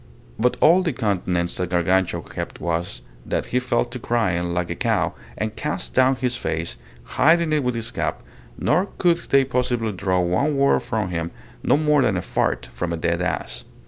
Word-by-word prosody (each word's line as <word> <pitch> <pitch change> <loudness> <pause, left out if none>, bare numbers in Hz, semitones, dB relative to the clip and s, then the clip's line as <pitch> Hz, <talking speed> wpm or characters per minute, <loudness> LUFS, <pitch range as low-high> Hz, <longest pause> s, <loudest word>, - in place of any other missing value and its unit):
But 125 +2 +2
all 175 +4 +6
the 170 -5 -1
countenance 90 -6 -1
that 90 -1 -2
Gargantua 90 +1 +1
kept - - -6
was, 85 -6 -3 0.2
that - - -2
he 125 - +4
fell 125 -2 +1
to 125 - -7
crying 95 -8 0
like 90 0 -1
a - - -2
cow, - - +1 0.2
and 110 +1 -3
cast 150 0 -3
down 130 +1 +4
his 125 0 -1
face, 80 - -3 0.3
hiding 155 - +3
it 150 -2 +2
with 125 -1 0
his 115 +1 -4
cap, - - -3 0.3
nor 185 +3 +2
could 170 -2 +3
they 135 0 +5
possibly 125 -3 0
draw 95 -1 0
one 95 +12 +1
word 140 0 +4
from 110 -6 -2
him, 85 -1 -2 0.3
no - - +3
more 150 -1 +3
than 110 -7 +2
a 85 - -2
fart 65 0 0
from 85 +8 -3
a 85 - -1
dead 85 +1 0
ass. 90 - -2
110 Hz, 190 wpm, -23 LUFS, 90-130 Hz, 0.3 s, all